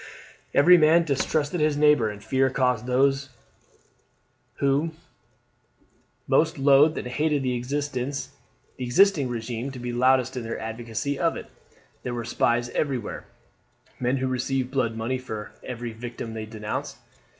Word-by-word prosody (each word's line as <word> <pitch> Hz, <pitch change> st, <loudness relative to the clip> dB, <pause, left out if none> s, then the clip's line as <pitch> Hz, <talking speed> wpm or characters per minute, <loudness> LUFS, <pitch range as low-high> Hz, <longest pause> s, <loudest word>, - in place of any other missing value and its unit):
Every 175 Hz, +5 st, +7 dB
man 160 Hz, +2 st, +5 dB
distrusted 150 Hz, +2 st, 0 dB
his 150 Hz, -1 st, +2 dB
neighbour, 150 Hz, -7 st, +4 dB
and 105 Hz, 0 st, -9 dB
fear 130 Hz, 0 st, +2 dB
caused 125 Hz, -3 st, 0 dB
those 135 Hz, +1 st, +2 dB, 1.3 s
who 140 Hz, +4 st, +1 dB, 1.3 s
most 160 Hz, 0 st, +2 dB
loathed 140 Hz, +3 st, +5 dB
and -, -, -4 dB
hated 150 Hz, +2 st, 0 dB
the 130 Hz, -1 st, 0 dB
existing 135 Hz, +3 st, -1 dB
regime 120 Hz, +2 st, -4 dB
to 135 Hz, -, -9 dB
be 120 Hz, 0 st, -4 dB
loudest 130 Hz, +1 st, +3 dB
in 125 Hz, -, -3 dB
their 115 Hz, 0 st, -4 dB
advocacy 115 Hz, +5 st, -4 dB
of 165 Hz, -1 st, +1 dB
it. -, -, -10 dB, 0.5 s
There 125 Hz, -1 st, -4 dB
were 120 Hz, -1 st, -4 dB
spies 120 Hz, 0 st, +1 dB
everywhere 130 Hz, -5 st, -3 dB, 0.7 s
men 125 Hz, +2 st, +1 dB
who 130 Hz, 0 st, -1 dB
received 130 Hz, 0 st, -1 dB
blood 125 Hz, -5 st, 0 dB
money 125 Hz, +3 st, -2 dB
for 110 Hz, -4 st, -7 dB
every 120 Hz, -2 st, -6 dB
victim 115 Hz, 0 st, -7 dB
they 110 Hz, -1 st, -5 dB
denounced. 105 Hz, -1 st, -5 dB
130 Hz, 135 wpm, -25 LUFS, 120-145 Hz, 1.3 s, Every